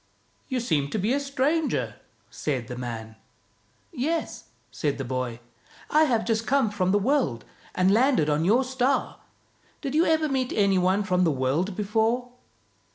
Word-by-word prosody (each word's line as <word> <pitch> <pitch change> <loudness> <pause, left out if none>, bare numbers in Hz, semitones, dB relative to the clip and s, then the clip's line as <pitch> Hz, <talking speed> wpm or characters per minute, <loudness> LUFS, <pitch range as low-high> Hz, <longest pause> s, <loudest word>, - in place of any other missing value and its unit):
"You 260 -3 -1
seem 155 - 0
to - - -2
be 210 +5 +1
a 280 - +1
stranger," 285 +3 -1 0.3
said 130 -6 -3
the 125 - -5
man. 115 -3 -6 0.4
" 110 -1 -39
Yes," 315 +6 -3 0.3
said 145 -3 -2
the 135 - -4
boy, 125 -2 -3 0.2
" - - -24
I 310 +1 +5
have 235 -6 +1
just 225 -1 -1
come 265 -5 +2
from 185 -3 0
the 205 - +4
world, 205 - 0 0.3
and 185 +1 +3
landed 245 - +3
on 150 +1 +1
your 225 +9 +3
star. 260 +1 0 0.6
Did 275 -2 -4
you 320 +3 +4
ever 315 -1 +2
meet 260 -3 -1
any 200 -2 +3
one 185 +3 +2
from 180 -1 +1
the 170 - +3
world 145 +8 0
before? 225 +4 0
210 Hz, 170 wpm, -26 LUFS, -, 0.6 s, I